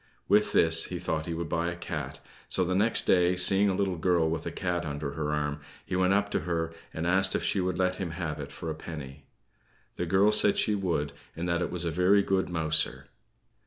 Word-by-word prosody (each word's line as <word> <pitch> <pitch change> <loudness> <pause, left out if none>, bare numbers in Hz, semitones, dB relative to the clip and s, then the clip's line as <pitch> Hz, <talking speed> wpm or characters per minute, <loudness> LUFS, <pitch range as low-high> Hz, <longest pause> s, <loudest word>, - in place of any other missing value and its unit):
With 105 +2 +3
this 80 0 +4
he 90 - -5
thought 80 -2 -3
he 85 - -3
would 85 0 -4
buy 85 +2 -1
a 85 - -5
cat; 75 -5 -6 0.3
so 95 - +1
the 90 +1 -1
next 105 +5 +2
day, 90 0 +3
seeing 95 +3 +5
a 95 - 0
little 95 -2 -1
girl 85 -1 +2
with 80 0 -3
a - - -3
cat 90 0 -2
under 75 -2 -4
her 75 -1 -3
arm, 75 0 -2 0.3
he - - -3
went 95 0 +2
up 100 +1 +1
to - - 0
her, 80 0 -2 0.2
and 80 - -4
asked 95 +2 +3
if - - -1
she 100 - +1
would 90 -1 -2
let 95 0 0
him 95 -3 -3
have 80 -2 -4
it - - -7
for 80 - -6
a - - -2
penny. 75 -3 -9 0.7
The 85 - -2
girl 95 +5 +4
said 105 -1 +3
she 105 - +1
would, 85 -7 -1 0.2
and 85 +2 -4
that 85 0 0
it - - -1
was 90 -1 -2
a 85 - -1
very 90 +4 +3
good 95 -1 0
mouser. 80 -2 +1
85 Hz, 235 wpm, -28 LUFS, 80-95 Hz, 0.7 s, seeing